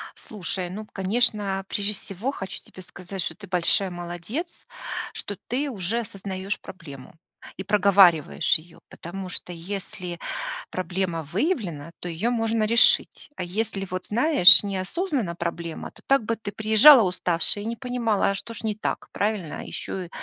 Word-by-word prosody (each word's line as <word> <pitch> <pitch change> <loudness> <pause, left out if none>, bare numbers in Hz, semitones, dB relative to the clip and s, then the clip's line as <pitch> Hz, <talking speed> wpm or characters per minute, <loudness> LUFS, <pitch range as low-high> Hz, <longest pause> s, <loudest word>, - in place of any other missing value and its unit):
Слушай, 185 -3 -5
ну, 210 +4 -6
конечно, 200 -1 0
прежде 205 +1 -1
всего 205 +6 -4
хочу 190 -8 -7
тебе 185 - -13
сказать, 180 +2 -7
что - - -4
ты 200 - -12
большая 185 +1 +2
молодец, 175 - -6 0.5
что 205 -2 -6
ты 275 +4 -1
уже 215 -1 -2
осознаешь 195 -2 -5
проблему 140 -8 -11 0.4
и 190 - -4
проговариваешь 190 -5 +4
её, 165 +2 -17
потому 185 +3 -7
что 180 0 -6
если 180 0 -6 0.5
проблема 180 -2 -2
выявлена, 170 - -2
то 180 - -3
её 175 +8 -1
можно 225 -1 +1
решить, 230 +6 +3
а 180 - -3
если 195 +1 -3
вот 185 0 -5
знаешь, 240 - +7
не 200 -1 -2
осознана 230 - -2
проблема 170 -1 -5
то - - -19
так 275 -3 +3
бы 230 +2 0
ты 210 -2 -6
приезжала 220 +6 +7
уставшая 180 +1 +1
и - - -6
не 230 +1 -3
понимала, 240 -6 0
а 200 - -1
что 230 +4 -7
ж 215 - -6
не 215 -1 0
так, 215 - -4
правильно? 200 -6 -2
Еще 185 -2 -5
195 Hz, 155 wpm, -25 LUFS, 180-220 Hz, 0.5 s, знаешь